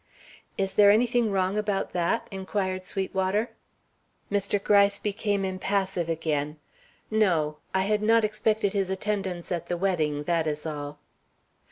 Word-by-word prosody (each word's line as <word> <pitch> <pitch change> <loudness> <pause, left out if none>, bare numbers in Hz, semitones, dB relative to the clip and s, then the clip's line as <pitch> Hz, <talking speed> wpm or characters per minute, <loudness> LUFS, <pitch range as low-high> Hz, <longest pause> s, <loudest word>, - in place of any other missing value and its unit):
"Is 195 -1 -1
there 205 0 +6
anything 235 +2 +3
wrong 190 +1 +1
about 205 -2 -1
that?" 175 +6 0
inquired 190 -1 -2
Sweetwater. 190 +3 -1 0.8
Mr. 200 0 +1
Gryce 200 -1 +4
became 205 -1 -1
impassive 190 -2 -1
again. 150 -2 -1 0.5
"No; 170 -9 +2
I 190 0 +1
had 210 +1 +1
not 225 +1 +4
expected 215 -1 +1
his 195 -2 0
attendance 190 -3 -3
at 170 -1 -2
the 175 - -2
wedding; 155 -6 0
that 165 0 0
is 150 0 -3
all." 145 -1 -5
190 Hz, 135 wpm, -27 LUFS, 170-205 Hz, 0.8 s, there